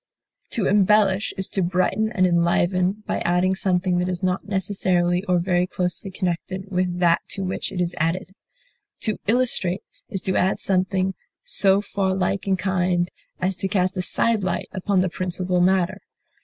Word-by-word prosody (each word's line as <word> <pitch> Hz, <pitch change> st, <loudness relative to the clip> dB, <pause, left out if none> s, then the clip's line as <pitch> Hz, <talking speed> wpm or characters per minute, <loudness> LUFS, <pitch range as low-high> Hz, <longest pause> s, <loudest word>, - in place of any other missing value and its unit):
deck, -, -, -12 dB
To 220 Hz, -, 0 dB
embellish 205 Hz, 0 st, +3 dB
is 190 Hz, -, +1 dB
to 195 Hz, -, -1 dB
brighten 185 Hz, +5 st, +1 dB
and 185 Hz, -5 st, +2 dB
enliven 180 Hz, +3 st, +1 dB
by -, -, -1 dB
adding 180 Hz, +2 st, +2 dB
something 185 Hz, -1 st, +1 dB
that 180 Hz, +1 st, 0 dB
is 180 Hz, 0 st, -3 dB
not 185 Hz, +1 st, -1 dB
necessarily 185 Hz, -2 st, +1 dB
or 180 Hz, -2 st, +2 dB
very 180 Hz, 0 st, +1 dB
closely 180 Hz, +2 st, -3 dB
connected 185 Hz, +1 st, -4 dB
with 180 Hz, -1 st, 0 dB
that 170 Hz, -1 st, +3 dB
to 195 Hz, -, -4 dB
which 185 Hz, 0 st, -3 dB
it 190 Hz, -, -4 dB
is 175 Hz, 0 st, 0 dB
added; 180 Hz, +4 st, -1 dB, 0.7 s
to 215 Hz, -3 st, -1 dB
illustrate 215 Hz, -6 st, +1 dB, 0.3 s
is 195 Hz, -5 st, -2 dB
to 190 Hz, -, -1 dB
add 190 Hz, +2 st, +2 dB
something 190 Hz, 0 st, +1 dB, 0.3 s
so 200 Hz, -, +3 dB
far 195 Hz, -2 st, -1 dB
like 190 Hz, +1 st, -1 dB
in 190 Hz, -1 st, +2 dB
kind 180 Hz, -2 st, 0 dB, 0.3 s
as 185 Hz, +1 st, 0 dB
to 195 Hz, -, -1 dB
cast 185 Hz, -1 st, 0 dB
a 185 Hz, -, -1 dB
side 220 Hz, +3 st, +1 dB
light 180 Hz, -2 st, -2 dB
upon 190 Hz, 0 st, +1 dB
the 185 Hz, -, +1 dB
principal 180 Hz, 0 st, -1 dB
matter. 185 Hz, -1 st, +2 dB
185 Hz, 170 wpm, -23 LUFS, 180-195 Hz, 0.7 s, embellish